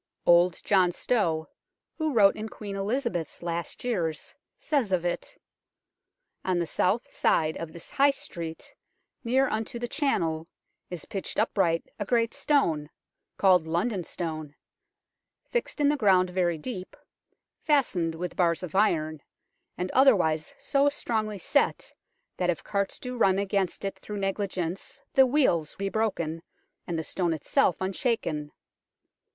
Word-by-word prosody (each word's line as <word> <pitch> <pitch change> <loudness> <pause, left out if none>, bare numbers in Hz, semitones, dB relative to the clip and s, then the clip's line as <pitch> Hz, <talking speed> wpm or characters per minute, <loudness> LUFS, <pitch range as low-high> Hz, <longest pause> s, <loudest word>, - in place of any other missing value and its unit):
Old 175 0 +5
John 185 -3 +4
Stow, 170 -6 0 0.5
who 315 -2 -1
wrote 205 -6 +5
in 215 +1 -5
Queen 205 -2 -7
Eliza 235 +6 -1
beth's 170 -2 -5
last 170 0 -4
years, 175 -11 -2 0.2
says 275 -10 0
of 180 -2 +1
it: 175 - -3 1.1
"On 185 -1 +1
the 170 - +1
south 190 +8 0
side 160 -1 +2
of 165 -1 -6
this 170 0 -10
high 280 +1 +5
street, 170 -11 -5 0.5
near 260 +3 +3
unto 220 +1 -3
the 240 0 -3
channel, 165 - 0 0.4
is 175 -4 -6
pitched 195 - -5
upright 165 -4 +1
a 205 - -2
great 230 0 +1
stone, 160 - +1 0.5
called 180 -4 +4
London 180 +4 0
Stone, 155 -3 -5 0.9
fixed 485 -9 -2
in 290 - +4
the 295 - +2
ground 185 -6 +4
very 175 -2 +1
deep, 185 +2 -6 0.6
fastened 190 - +1
with 175 +1 -5
bars 170 -1 +2
of 180 - -6
iron, 155 -7 +1 0.6
and 180 +1 -2
otherwise 180 - +3
so 280 0 +2
strongly 220 -6 -2
set, 280 +9 0 0.4
that 180 -1 0
if 170 - -1
carts 200 -1 -1
do 250 -1 -6
run 195 -4 +4
against 195 -1 -1
it 195 - -4
through 210 - -6
negligence 195 -3 -3
the 265 -1 +6
wheels 245 - +2
be 195 0 -2
broken 170 -7 -1 0.5
and 170 - -2
the 160 - -2
stone 175 0 -1
itself 160 +3 +1
un 190 +1 -2
shaken. 160 - -1
190 Hz, 145 wpm, -27 LUFS, 165-230 Hz, 1.1 s, the